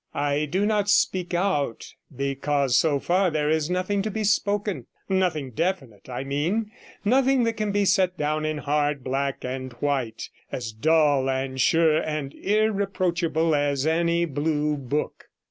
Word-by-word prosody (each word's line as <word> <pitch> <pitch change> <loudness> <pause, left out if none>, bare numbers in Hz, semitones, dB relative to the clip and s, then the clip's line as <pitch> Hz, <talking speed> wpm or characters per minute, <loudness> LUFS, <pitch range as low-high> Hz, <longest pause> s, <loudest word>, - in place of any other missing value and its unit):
'I 145 +1 0
do 185 +7 0
not 210 -1 +1
speak 185 -3 +2
out 170 - -1 0.2
because, 140 0 0
so 150 -3 +3
far, 185 +5 +2
there 150 -1 0
is 160 0 0
nothing 185 +3 0
to 215 - -2
be 215 +1 -3
spoken, 205 - 0 0.2
nothing 175 -8 0
definite, 135 - -3
I 125 +1 -4
mean, 170 +11 -1 0.3
nothing 260 +3 +3
that 230 0 +1
can 215 -2 -2
be 205 0 +1
set 185 -2 +2
down 155 +1 -1
in 155 0 -1
hard 145 -1 0
black 135 +1 -2
and 130 0 -4
white, 125 -3 -2 0.2
as 120 -3 -4
dull 145 +2 +2
and 130 0 -2
sure 160 +2 +4
and 150 -3 -4
irreproachable 185 -6 0
as 145 -1 +1
any 170 +1 +2
blue 150 0 -1
book. 140 +2 -3
155 Hz, 150 wpm, -25 LUFS, 140-190 Hz, 0.3 s, sure